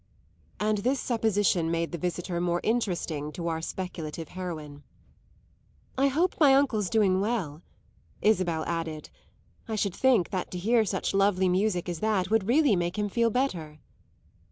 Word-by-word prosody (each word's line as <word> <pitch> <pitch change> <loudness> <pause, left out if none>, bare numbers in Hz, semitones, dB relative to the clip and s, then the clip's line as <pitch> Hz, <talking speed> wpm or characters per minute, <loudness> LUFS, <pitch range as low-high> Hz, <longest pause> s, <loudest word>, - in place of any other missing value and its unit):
And 210 0 +1
this 255 +6 0
supposition 205 -7 +1
made 165 0 -1
the 170 - -3
visitor 175 0 -3
more 175 0 0
interesting 175 -10 -1
to 170 -1 -4
our 160 -1 -2
speculative 165 -3 -5
heroine. 155 -6 -7 1.1
"I 270 +1 +3
hope 330 +7 0
my 280 -4 +6
uncle's 230 -9 +2
doing 195 -3 +3
well," 190 -9 -2 0.6
Isabel 175 -7 +1
added. 165 -2 -4 0.6
"I 220 - -2
should 200 -3 -1
think 250 -8 +3
that 185 -2 -3
to 180 - -6
hear 220 +5 +2
such 190 -1 -2
lovely 195 -1 +3
music 185 -1 0
as 175 -2 -4
that 205 -2 0
would 220 -3 +2
really 270 -2 +4
make 175 +2 -2
him 210 0 -1
feel 230 +3 +2
better." 180 - -2
190 Hz, 155 wpm, -27 LUFS, 170-220 Hz, 1.1 s, my